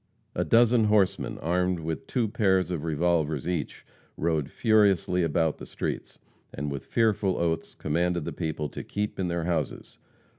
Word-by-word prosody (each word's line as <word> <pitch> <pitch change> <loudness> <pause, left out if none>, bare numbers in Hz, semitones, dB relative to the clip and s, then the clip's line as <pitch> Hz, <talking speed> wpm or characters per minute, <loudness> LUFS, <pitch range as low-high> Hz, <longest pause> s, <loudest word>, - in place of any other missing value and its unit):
A - - 0
dozen 115 -1 +4
horsemen, 100 -2 +2
armed 90 +2 +1
with 80 0 -4
two 120 -4 0
pairs 95 -5 +2
of 80 -4 -3
revolvers 80 -2 0
each, 90 -3 -3 0.3
rode 80 -3 0
furiously 100 -5 +3
about 80 -1 +1
the - - -7
streets, - - -4 0.3
and 70 +2 -4
with 70 - -5
fearful 105 -4 +1
oaths 85 -1 -1
commanded 85 +1 0
the - - -4
people 80 -3 -3
to - - -7
keep 105 -1 -3
in 95 - 0
their 85 -1 -1
houses. 80 -5 -3
85 Hz, 155 wpm, -27 LUFS, 80-100 Hz, 0.3 s, dozen